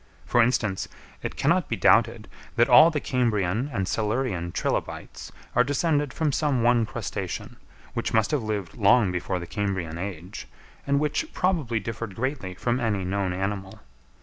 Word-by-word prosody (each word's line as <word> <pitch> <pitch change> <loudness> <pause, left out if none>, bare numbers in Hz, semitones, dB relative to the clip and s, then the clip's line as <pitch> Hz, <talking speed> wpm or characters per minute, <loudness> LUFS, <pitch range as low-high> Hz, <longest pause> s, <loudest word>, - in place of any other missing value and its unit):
For 120 - +3
instance, 110 -5 +1 0.3
it - - -4
cannot - - +1
be - - 0
doubted - - +3 0.3
that - - +4
all 160 +2 +8
the 155 -3 -1
Cambrian 115 -2 0
and 95 -6 -2
Silurian 105 -6 -1
trilobites - - -3 0.2
are 125 - +6
descended 145 +1 0
from 150 +2 0
some 140 -4 +1
one 120 -2 +3
crustacean, - - -5 0.4
which - - -2
must 110 -1 +2
have 150 - +1
lived 105 -5 -4
long 105 -1 +4
before 90 +1 -2
the 85 - -5
Cambrian 90 -3 -3
age, 90 0 -6 0.4
and 140 0 +3
which 150 - -1
probably 160 -12 0
differed 110 -1 -6
greatly 125 -7 -3
from 120 +6 -1
any 105 -5 0
known 95 0 -1
animal. 95 +1 -4
110 Hz, 155 wpm, -26 LUFS, 95-130 Hz, 0.4 s, all